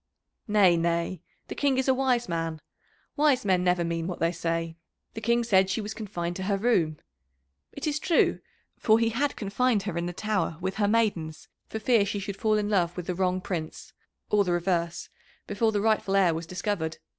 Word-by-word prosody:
"Nay, 200 Hz, -5 st, +5 dB
nay. 170 Hz, +1 st, -1 dB, 0.3 s
The -, -, -5 dB
King 280 Hz, -2 st, +1 dB
is 265 Hz, -, 0 dB
a 265 Hz, -, +5 dB
wise 255 Hz, -2 st, +1 dB
man. 165 Hz, -2 st, -3 dB, 0.6 s
Wise 290 Hz, -6 st, +3 dB
men 185 Hz, -2 st, +2 dB
never 180 Hz, -1 st, +2 dB
mean 165 Hz, 0 st, -2 dB
what 180 Hz, -, -4 dB
they 165 Hz, 0 st, +2 dB
say. 165 Hz, -1 st, -2 dB, 0.4 s
The 225 Hz, -, -6 dB
King 235 Hz, +2 st, +2 dB
said 190 Hz, -4 st, +3 dB
she 190 Hz, -, -1 dB
was 210 Hz, 0 st, -4 dB
confined 175 Hz, -6 st, -4 dB
to 190 Hz, -, -4 dB
her 200 Hz, -, +2 dB
room. 185 Hz, -9 st, +1 dB, 0.7 s
It -, -, -6 dB
is 300 Hz, -1 st, 0 dB
true, 340 Hz, -, +2 dB, 0.4 s
for 220 Hz, -1 st, +4 dB
he 230 Hz, 0 st, +2 dB
had 275 Hz, +5 st, -1 dB
confined 215 Hz, +1 st, 0 dB
her 185 Hz, -4 st, -3 dB
in 170 Hz, -, -2 dB
the -, -, -3 dB
Tower 190 Hz, -3 st, -2 dB
with 190 Hz, +1 st, -3 dB
her 205 Hz, -1 st, +2 dB
maidens 180 Hz, -8 st, 0 dB, 0.2 s
for -, -, -5 dB
fear 225 Hz, -1 st, +3 dB
she 200 Hz, +1 st, -3 dB
should 200 Hz, 0 st, -5 dB
fall 215 Hz, +1 st, +2 dB
in 210 Hz, -1 st, 0 dB
love 180 Hz, -4 st, +1 dB
with 180 Hz, -, -4 dB
the 180 Hz, -, -2 dB
wrong 185 Hz, 0 st, 0 dB
Prince, 165 Hz, -4 st, -5 dB, 0.4 s
or 210 Hz, -1 st, +4 dB
the 180 Hz, -2 st, 0 dB
reverse, 170 Hz, -1 st, -1 dB, 0.4 s
before 220 Hz, +2 st, 0 dB
the 205 Hz, -1 st, 0 dB
rightful 215 Hz, -2 st, +1 dB
heir 185 Hz, -4 st, +4 dB
was 165 Hz, +1 st, -5 dB
discovered. 180 Hz, -3 st, -3 dB
195 Hz, 205 wpm, -27 LUFS, 170-220 Hz, 0.7 s, Nay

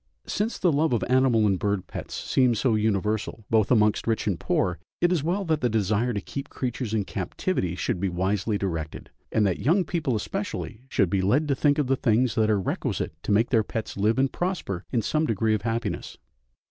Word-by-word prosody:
Since 220 Hz, +3 st, -2 dB
the 180 Hz, -, +2 dB
love 150 Hz, 0 st, +2 dB
of 120 Hz, -, +1 dB
animal 125 Hz, -4 st, +3 dB
and 95 Hz, -3 st, +2 dB
bird 100 Hz, -2 st, -1 dB
pets -, -, -7 dB
seems 125 Hz, -4 st, +2 dB
so 125 Hz, -4 st, +2 dB
universal, 110 Hz, 0 st, -1 dB
both 110 Hz, -2 st, +3 dB
amongst 105 Hz, -3 st, +3 dB
rich 115 Hz, -1 st, 0 dB
and 95 Hz, -5 st, -1 dB
poor, 90 Hz, -3 st, 0 dB, 0.2 s
it 175 Hz, 0 st, +3 dB
is 175 Hz, -5 st, +2 dB
well 185 Hz, +5 st, 0 dB
that 160 Hz, -3 st, 0 dB
the 125 Hz, -, +2 dB
desire 110 Hz, +2 st, +1 dB
to 105 Hz, -, -1 dB
keep 140 Hz, +7 st, -6 dB
creatures 125 Hz, -3 st, -3 dB
in 105 Hz, -3 st, 0 dB
captivity 95 Hz, -, -2 dB
should 90 Hz, -, -2 dB
be 95 Hz, +1 st, 0 dB
wisely 95 Hz, +4 st, 0 dB
directed, 80 Hz, -6 st, -4 dB, 0.2 s
and 110 Hz, -, +2 dB
that 95 Hz, -3 st, 0 dB
young 175 Hz, +8 st, +3 dB
people 155 Hz, -7 st, -1 dB
especially 125 Hz, -, -4 dB
should 95 Hz, -10 st, +1 dB
be 95 Hz, -, +2 dB
led 130 Hz, +11 st, +2 dB
to -, -, +4 dB
think 145 Hz, +2 st, +2 dB
of 150 Hz, -, +2 dB
the 135 Hz, +1 st, +2 dB
things 120 Hz, 0 st, +2 dB
that 110 Hz, -1 st, +2 dB
are 105 Hz, -2 st, +3 dB
requisite 95 Hz, -, -2 dB
to -, -, -3 dB
make 110 Hz, +4 st, +3 dB
their 115 Hz, -3 st, +4 dB
pets 110 Hz, +1 st, -5 dB
live 105 Hz, +4 st, +1 dB
and 135 Hz, 0 st, +1 dB
prosper 175 Hz, -, -2 dB
in 115 Hz, -4 st, +1 dB
some 155 Hz, +5 st, +1 dB
degree 110 Hz, 0 st, +1 dB
of 105 Hz, -, 0 dB
happiness. 115 Hz, -4 st, -3 dB
110 Hz, 210 wpm, -26 LUFS, 100-135 Hz, 0.2 s, to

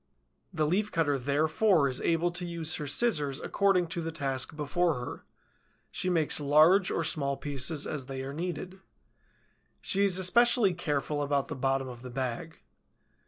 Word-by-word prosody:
The 155 Hz, -4 st, 0 dB
Leaf 200 Hz, +7 st, 0 dB
cutter 145 Hz, -5 st, 0 dB
therefore 155 Hz, -, +2 dB
is 130 Hz, -1 st, -2 dB
able 170 Hz, +1 st, +1 dB
to 175 Hz, +1 st, -4 dB
use 170 Hz, -2 st, -3 dB
her 150 Hz, -, -5 dB
scissors 145 Hz, -, +2 dB
according 195 Hz, -3 st, +1 dB
to 170 Hz, -, -3 dB
the 165 Hz, -, -4 dB
task 140 Hz, -2 st, -3 dB
before 155 Hz, +3 st, 0 dB
her; 125 Hz, 0 st, -7 dB, 0.7 s
she 185 Hz, -, -2 dB
makes 165 Hz, -4 st, +1 dB
large 155 Hz, +7 st, +4 dB
or 165 Hz, -, -1 dB
small 140 Hz, -3 st, -1 dB
pieces 145 Hz, +2 st, +1 dB
as 140 Hz, -4 st, -5 dB
they 135 Hz, -1 st, -5 dB
are 135 Hz, +1 st, -6 dB
needed. 180 Hz, +3 st, -5 dB, 1.0 s
She 200 Hz, +1 st, 0 dB
is 190 Hz, -2 st, +4 dB
especially 220 Hz, +2 st, +3 dB
careful 150 Hz, -3 st, -2 dB
about 140 Hz, -1 st, -1 dB
the 155 Hz, -, -4 dB
bottom 135 Hz, 0 st, -1 dB
of 120 Hz, -2 st, -10 dB
the 125 Hz, -, -9 dB
bag. 130 Hz, +5 st, -5 dB
155 Hz, 165 wpm, -29 LUFS, 140-175 Hz, 1.0 s, large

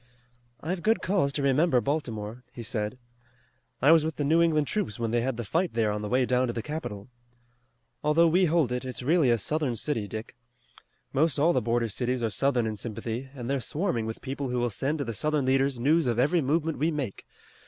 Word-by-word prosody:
"I've 175 Hz, +3 st, -3 dB
good 225 Hz, +4 st, +2 dB
cause 180 Hz, -7 st, +1 dB
to 140 Hz, -, -1 dB
remember 140 Hz, 0 st, +3 dB
Baltimore," 120 Hz, -4 st, -3 dB
he 120 Hz, -, -8 dB
said. 105 Hz, +2 st, -3 dB, 0.9 s
"I 145 Hz, -, +7 dB
was 165 Hz, -2 st, +6 dB
with 160 Hz, -1 st, -2 dB
the 145 Hz, -, -2 dB
New 160 Hz, +4 st, +3 dB
England 155 Hz, -3 st, +3 dB
troops 135 Hz, -, -2 dB
when 115 Hz, -1 st, -2 dB
they 120 Hz, 0 st, +2 dB
had 130 Hz, -1 st, -2 dB
the 120 Hz, -, -3 dB
fight 165 Hz, -, -1 dB
there 110 Hz, -2 st, +2 dB
on 105 Hz, 0 st, -3 dB
the 105 Hz, -, -4 dB
way 125 Hz, +2 st, +2 dB
down 125 Hz, +1 st, +2 dB
to 120 Hz, -, -2 dB
the 115 Hz, -, -4 dB
capital. 115 Hz, -10 st, -5 dB, 1.0 s
Although 155 Hz, +3 st, +4 dB
we 180 Hz, +3 st, +4 dB
hold 160 Hz, -6 st, +2 dB
it, 125 Hz, +1 st, -2 dB
it's 130 Hz, -1 st, -5 dB
really 155 Hz, 0 st, +3 dB
a 120 Hz, -, +4 dB
Southern 145 Hz, +2 st, -1 dB
city, 115 Hz, -3 st, -1 dB
Dick. 110 Hz, +4 st, -7 dB, 0.8 s
Most 155 Hz, +1 st, +2 dB
all 160 Hz, +4 st, +4 dB
the -, -, +2 dB
border 115 Hz, +1 st, 0 dB
cities 125 Hz, +3 st, -2 dB
are 110 Hz, -, 0 dB
Southern 125 Hz, +2 st, +1 dB
in 110 Hz, -1 st, -3 dB
sympathy, 115 Hz, +4 st, -5 dB
and 120 Hz, -3 st, -6 dB
they're 140 Hz, +1 st, 0 dB
swarming 135 Hz, -, -1 dB
with 110 Hz, -, -6 dB
people 135 Hz, 0 st, -4 dB
who 125 Hz, -, -1 dB
will 120 Hz, -1 st, 0 dB
send 140 Hz, +9 st, -1 dB
to 140 Hz, -, -3 dB
the 115 Hz, -, -4 dB
Southern 150 Hz, +5 st, 0 dB
leaders 135 Hz, -1 st, +2 dB
news 150 Hz, +4 st, +3 dB
of 120 Hz, -2 st, 0 dB
every 150 Hz, +7 st, +3 dB
movement 155 Hz, +3 st, 0 dB
we 155 Hz, +3 st, +2 dB
make. 140 Hz, -10 st, -4 dB
130 Hz, 220 wpm, -27 LUFS, 115-155 Hz, 1.0 s, I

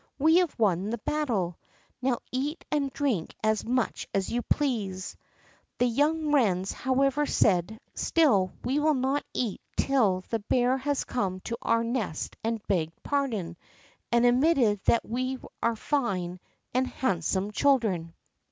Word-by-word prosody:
we 320 Hz, +4 st, +5 dB
have 360 Hz, -3 st, +1 dB
won 200 Hz, -3 st, +1 dB
the 235 Hz, -, -2 dB
battle; 220 Hz, -, -1 dB, 0.4 s
now 255 Hz, -1 st, +1 dB
eat 285 Hz, +6 st, -3 dB
and 280 Hz, -2 st, 0 dB
drink 255 Hz, -, -1 dB
as 215 Hz, -1 st, +2 dB
much 250 Hz, 0 st, -1 dB
as 195 Hz, -1 st, 0 dB
you 240 Hz, -, 0 dB
please." 210 Hz, -11 st, -1 dB, 0.6 s
The 245 Hz, -, +3 dB
young 295 Hz, +5 st, +1 dB
wrens, 195 Hz, -9 st, +2 dB
however, 275 Hz, +3 st, +1 dB
said: 190 Hz, +2 st, +2 dB
"Still 210 Hz, -, +3 dB
we 270 Hz, +4 st, +1 dB
will 305 Hz, 0 st, +3 dB
not 265 Hz, +2 st, 0 dB
eat 230 Hz, -6 st, -2 dB, 0.2 s
till 215 Hz, -10 st, +2 dB
the 225 Hz, -, -1 dB
bear 245 Hz, +4 st, +2 dB
has 285 Hz, +1 st, -1 dB
come 190 Hz, -7 st, -2 dB
to 235 Hz, -, -4 dB
our 230 Hz, 0 st, +2 dB
nest 230 Hz, -9 st, -3 dB
and 225 Hz, -1 st, -2 dB
begged 165 Hz, -4 st, -1 dB
pardon, 225 Hz, -12 st, -1 dB, 0.5 s
and 235 Hz, 0 st, +4 dB
admitted 245 Hz, -4 st, +4 dB
that 235 Hz, -, +3 dB
we 255 Hz, +3 st, -2 dB, 0.2 s
are 230 Hz, 0 st, +1 dB
fine 195 Hz, -, -1 dB, 0.3 s
and 255 Hz, +1 st, +2 dB
handsome 190 Hz, -3 st, -1 dB
children." 210 Hz, -11 st, +1 dB
235 Hz, 145 wpm, -28 LUFS, 195-275 Hz, 0.6 s, we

